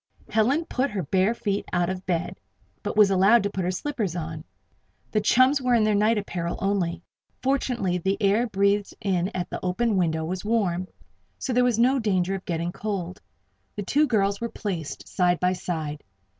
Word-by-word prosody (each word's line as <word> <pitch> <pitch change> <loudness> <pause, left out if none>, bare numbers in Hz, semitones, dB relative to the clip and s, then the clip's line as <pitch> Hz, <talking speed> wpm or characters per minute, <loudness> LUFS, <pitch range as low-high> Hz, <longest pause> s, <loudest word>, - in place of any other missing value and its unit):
Helen 255 +10 +2
put 270 -1 -1
her 195 -3 -3
bare 190 +9 +1
feet 200 -3 -2
out 175 -1 +1
of 185 0 -5
bed, 170 -2 -2 0.4
but - - -4
was 205 -2 +6
allowed 195 +4 +5
to 200 - -1
put 190 - -2
her 175 - 0
slippers 205 - -2
on. 160 -2 -5 0.7
The 215 - +1
chums 255 +6 +4
were 250 -1 +3
in 225 - +3
their 215 0 +2
night 215 +2 +3
apparel 175 -4 -3
only. 190 -4 -1 0.4
Fortunately 245 -9 0
the 195 +3 0
air 215 +4 +2
breathed 200 0 +1
in 185 -2 0
at 180 -1 -3
the - - -5
open 200 +4 +1
window 160 -3 0
was 180 +2 -4
warm. 190 -5 0 0.5
So 260 - -3
there 250 +1 +4
was 245 -3 +2
no 255 +3 +4
danger 190 -4 +1
of 195 - -3
their 175 - -2
getting 170 +1 -2
cold. 190 -3 -4 0.5
The 205 - -3
two 270 +9 0
new - - -4
girls 200 -4 +1
were 235 - -2
placed 180 -11 -5
side 180 -2 +1
by 180 0 +2
side. 155 -5 -4
195 Hz, 195 wpm, -25 LUFS, 180-225 Hz, 0.7 s, was